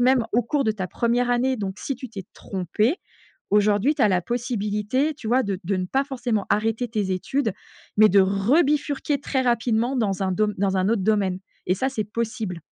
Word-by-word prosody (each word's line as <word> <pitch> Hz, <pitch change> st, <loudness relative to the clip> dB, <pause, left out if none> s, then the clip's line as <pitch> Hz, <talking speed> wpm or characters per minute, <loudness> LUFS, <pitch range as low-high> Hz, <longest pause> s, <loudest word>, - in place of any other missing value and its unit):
même, 255 Hz, 0 st, +4 dB
au 240 Hz, +2 st, +3 dB
cours 275 Hz, +4 st, 0 dB
de 220 Hz, -, +2 dB
ta 195 Hz, -3 st, -4 dB
1re 245 Hz, +1 st, 0 dB
année. 255 Hz, +2 st, +1 dB
Donc, 195 Hz, -2 st, -4 dB
si 275 Hz, -, -3 dB
tu 255 Hz, -1 st, -8 dB
t'es 195 Hz, -5 st, -7 dB
trompé, 210 Hz, -, -1 dB, 0.5 s
aujourd'hui, 210 Hz, +6 st, +3 dB
tu 285 Hz, -, 0 dB
as 215 Hz, -, +5 dB
la 185 Hz, -2 st, +2 dB
possibilité, 240 Hz, -, -1 dB
tu 235 Hz, -7 st, -7 dB
vois, 255 Hz, +2 st, +3 dB
de 200 Hz, -2 st, -2 dB
de 195 Hz, +1 st, 0 dB
ne 185 Hz, -, -2 dB
pas 270 Hz, +8 st, 0 dB
forcément 240 Hz, -6 st, -2 dB
arrêter 225 Hz, +4 st, +1 dB
tes 210 Hz, -4 st, -2 dB
études, 220 Hz, +4 st, -1 dB, 0.4 s
mais 215 Hz, 0 st, +7 dB
de 200 Hz, +1 st, +6 dB
rebifurquer 280 Hz, -, +2 dB
très 270 Hz, -2 st, -1 dB
rapidement 240 Hz, +1 st, +1 dB
dans 200 Hz, -5 st, 0 dB
un 190 Hz, -, 0 dB
dom 210 Hz, +2 st, +1 dB
dans 195 Hz, -1 st, +1 dB
un 185 Hz, +2 st, +1 dB
autre 220 Hz, -5 st, +1 dB
domaine. 195 Hz, -3 st, +1 dB, 0.3 s
Et 185 Hz, -, +2 dB
ça, 260 Hz, +7 st, 0 dB
c'est 220 Hz, -6 st, -2 dB
possible. 220 Hz, -4 st, -4 dB
220 Hz, 205 wpm, -24 LUFS, 200-255 Hz, 0.5 s, mais